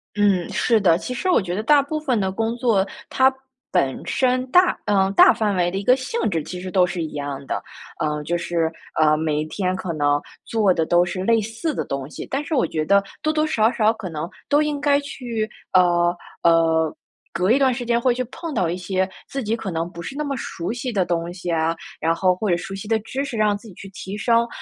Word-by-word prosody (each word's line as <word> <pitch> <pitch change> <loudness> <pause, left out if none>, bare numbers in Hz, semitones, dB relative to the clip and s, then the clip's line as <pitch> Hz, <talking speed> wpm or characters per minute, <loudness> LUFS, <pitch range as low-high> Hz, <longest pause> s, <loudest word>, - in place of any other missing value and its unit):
嗯， 200 -4 +2
是 225 -3 +2
的， 170 -4 +4
其 250 - -5
实 370 +9 -2
我 - - +5
觉 175 -2 -4
得 210 - -1
大 285 +6 +5
部 310 +2 -3
分 265 -7 0
的 190 -1 0
工 225 +3 -1
作， 225 -6 +2 0.2
它 265 0 +4 0.4
本 135 -1 +1
身 255 0 +1
大 360 +6 +5
呃， 195 -2 +2
大 195 - +7
范 210 -3 0
围 175 -1 +2
的 190 - -4
一 195 - -3
个 250 +5 +5
性 270 - -4
质 165 - 0
其 180 +4 -7
实 185 0 -6
都 185 -2 +4
是 180 -2 -3
一 155 - -5
样 140 -1 -5
的。 - - -3 0.4
呃， 150 -2 -1
就 175 - -1
是， 170 -1 -1 0.3
呃， 155 -1 +5
每 155 -1 -1
一 155 - -3
天 185 +2 -2
可 185 -3 -4
能 145 -1 +2 0.3
做 210 -5 +2
的 165 - +1
都 175 +2 +4
是 185 +1 -4
类 230 +2 +3
似 225 +8 -3
的 - - -2
东 140 0 -4
西， - - -7
但 275 +2 -1
是 310 - -2
我 260 - +3
觉 155 - -2
得 200 +4 +4 0.2
多 310 - +1
多 310 0 +1
少 225 -6 +2
少 220 -2 +2
可 210 -5 -7
能 160 0 -4 0.2
都 290 +1 +4
应 295 -1 -2
该 285 -1 +3
去 240 -6 -4 0.3
呃， 175 -1 +4 0.3
呃， 165 -1 +3 0.4
隔 180 +5 +1
一 270 - +4
段 265 -2 +4
时 245 0 -4
间 235 0 +1
会 255 - +3
去 255 +1 -2
碰 320 +7 -7
到 185 -6 +1
一 170 - -1
些 185 +1 -1 0.2
自 275 -2 -4
己 215 +2 0
可 225 -4 -5
能 165 0 -2
不 170 -1 -9
是 270 - -7
那 300 - -1
么 280 -1 -2
熟 175 -1 -4
悉 245 +1 -4
的 195 -5 +1
东 170 0 -2
西 175 -1 -5
啊， 165 0 +1 0.2
然 165 +1 +2
后 185 0 +2
或 205 +3 -2
者 175 - +3
熟 195 - -7
悉 195 +2 -7
的 225 - +2
知 265 +5 -3
识， 265 -5 -5
让 210 -1 +3
自 205 +3 -11
己 195 - -12
去 195 - -10
提 195 +1 -7
升。 230 +1 +2
195 Hz, 265 characters per minute, -22 LUFS, 175-245 Hz, 0.4 s, 大